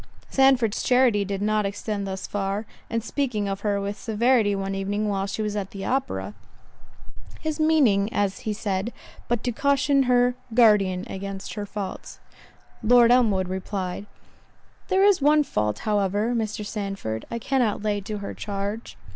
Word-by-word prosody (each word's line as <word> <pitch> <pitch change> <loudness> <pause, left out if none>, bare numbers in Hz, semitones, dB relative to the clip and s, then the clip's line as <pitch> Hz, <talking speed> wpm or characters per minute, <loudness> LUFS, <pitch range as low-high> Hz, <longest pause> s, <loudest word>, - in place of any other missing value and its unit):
Sandford's 265 -5 +3
charity 250 -5 +3
did 200 0 -3
not 215 0 +2
extend 200 0 -3
thus 190 0 -4
far; 200 +1 -2 0.2
and 230 -1 -1
speaking 235 -5 -1
of 195 0 -3
her 205 -1 0
with 200 +1 -4
severity 225 -1 +2
one 195 0 -3
evening 200 +2 -1
while 195 -1 -1
she 210 +2 -3
was 210 -1 -2
at 195 -2 -3
the 195 -1 -7
opera, 265 +4 -2 1.1
"His 315 0 -3
meaning," 255 -11 +3
as 200 -1 0
he 215 - -3
said, 205 +1 -2 0.3
"but 240 -1 -1
to 245 - 0
caution 280 +2 +2
her 245 0 +4 0.2
guardian 200 -6 +4
against 195 0 -6
her 205 -2 -5
faults," 200 -1 -6 0.6
Lord 240 +1 +6
Elmwood 215 -7 +3
replied, 190 +1 -4 0.8
"There 380 0 +3
is 405 -6 +4
one 300 +1 +5
fault, 105 - -1
however, 205 +2 +1
Mr. 215 -2 -2
Sandford, 195 - -4
I 235 - -3
cannot 235 -3 0
lay 205 -1 0
to 210 +2 -5
her 200 -1 -6
charge." 205 +2 -5
210 Hz, 155 wpm, -25 LUFS, 195-240 Hz, 1.1 s, Lord